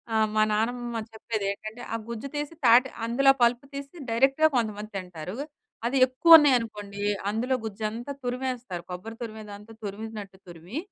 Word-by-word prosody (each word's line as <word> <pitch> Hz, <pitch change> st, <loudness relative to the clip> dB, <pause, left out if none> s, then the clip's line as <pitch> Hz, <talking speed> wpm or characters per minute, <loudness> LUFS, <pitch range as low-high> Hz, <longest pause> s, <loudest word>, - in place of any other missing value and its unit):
ఆహ్, 220 Hz, 0 st, +4 dB
మా 215 Hz, -, +4 dB
నానమ్మ 235 Hz, +2 st, -1 dB, 0.2 s
చెప్పేది 220 Hz, -2 st, -3 dB
ఏంటంటే, 215 Hz, +4 st, -8 dB
ఆ -, -, +1 dB
గుజ్జు 235 Hz, +3 st, -5 dB
తీసి 295 Hz, +2 st, -3 dB
తాటి 245 Hz, +3 st, +7 dB, 0.2 s
అందులో 270 Hz, +4 st, +5 dB
పలుపు 240 Hz, +3 st, +3 dB
తీసి 280 Hz, +2 st, -7 dB
డైరెక్ట్‌గా 270 Hz, +7 st, +4 dB
కొంతమంది 215 Hz, -3 st, -1 dB
తింటారు. 180 Hz, 0 st, -7 dB, 0.5 s
అది 250 Hz, +3 st, +1 dB
ఎక్కువ 325 Hz, +6 st, +9 dB
ఉన్నాయి 290 Hz, -3 st, +5 dB
అనుకోండి 205 Hz, -3 st, -7 dB, 0.3 s
అందులో 245 Hz, +5 st, 0 dB
గుజ్జంతా 220 Hz, +5 st, -4 dB
తురిమేస్తారు 250 Hz, -7 st, -3 dB
కొబ్బరి 205 Hz, +6 st, -7 dB
తురిమేదంతా 215 Hz, -1 st, -8 dB
తురిమినట్టు 205 Hz, -1 st, -7 dB
తురిమి 175 Hz, -, -8 dB
225 Hz, 145 wpm, -27 LUFS, 210-250 Hz, 0.5 s, ఎక్కువ